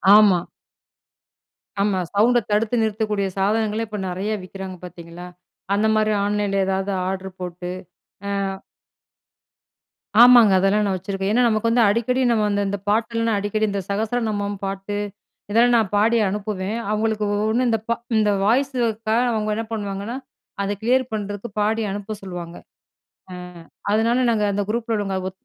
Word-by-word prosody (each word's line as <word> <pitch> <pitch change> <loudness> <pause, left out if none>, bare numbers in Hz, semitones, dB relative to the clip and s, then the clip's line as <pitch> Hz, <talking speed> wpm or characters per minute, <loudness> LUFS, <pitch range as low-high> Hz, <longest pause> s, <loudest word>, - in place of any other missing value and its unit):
ஆமா. 205 -4 +6 1.4
ஆமா 200 -2 +1
சவுண்ட 240 +4 +4
தடுத்து 215 +3 +1
நிறுத்தக்கூடிய 210 -2 0
சாதனங்களே 215 +2 +1
இப்ப 210 -1 -5
நெறையா 195 +4 -2
விக்கிறாங்க 190 0 -8
பார்த்தீங்களா, 175 0 -10 0.5
அந்த 215 +2 +2
மாரி 215 0 +2
ஆன்லைன்ல 205 -1 0
ஏதாவது 195 +1 -1 0.2
ஆர்ட்ர் 190 0 -5
போட்டு. 180 0 -5 0.6
ஆ - - -1 1.9
ஆமாங்க. 240 -4 +8
அதெல்லாம் 205 +2 +2
நான் 195 -1 0
வச்சுருக்கேன். 195 +2 -3
ஏனா, 245 - +3
நமக்கு 220 0 +1
வந்து 235 +1 +4
அடிக்கடி 235 +5 +1
நம்ம 220 -2 +2
வந்து, 205 0 0
இந்த 200 +1 -2
பாட்டெல்லாம் 230 0 +1
அடிக்கடி 205 +2 0
இந்த 200 -1 -2
சகஸ்ர 220 +4 -1
நமம் 205 -1 -2
பாட்டு, 195 +1 -4 0.5
இதெல்லாம் 240 +3 +4
நான் 215 -4 0
பாடி 225 +3 +3
அனுப்புவேன். 205 +1 -3
அவங்களுக்கு 215 0 0
ஒவ்ஒண்ணு 220 +4 +1
இந்த, 225 - +2 0.4
இந்த 210 -1 +3
வாய்ஸுக்காக 235 -2 +1
அவங்க 215 -1 -1
என்ன 225 - -3
பண்ணுவாங்கன்னா, 205 +3 -4 0.5
அத 200 - -1
கிளியர் 255 +2 +2
பண்றதுக்கு 205 +1 -4
பாடி 220 +2 +1
அனுப்ப 205 +2 -5
சொல்லுவாங்க. 175 -2 -7 0.8
ஆ, - - -7 0.6
அதனால 230 +4 +2
நாங்க 220 -2 +1
அந்த 205 +1 -1
குரூப்பில 230 0 -1
உள்ளவங்க 195 -2 -2
ஒ - - -1
210 Hz, 140 wpm, -22 LUFS, 195-225 Hz, 1.9 s, ஆமாங்க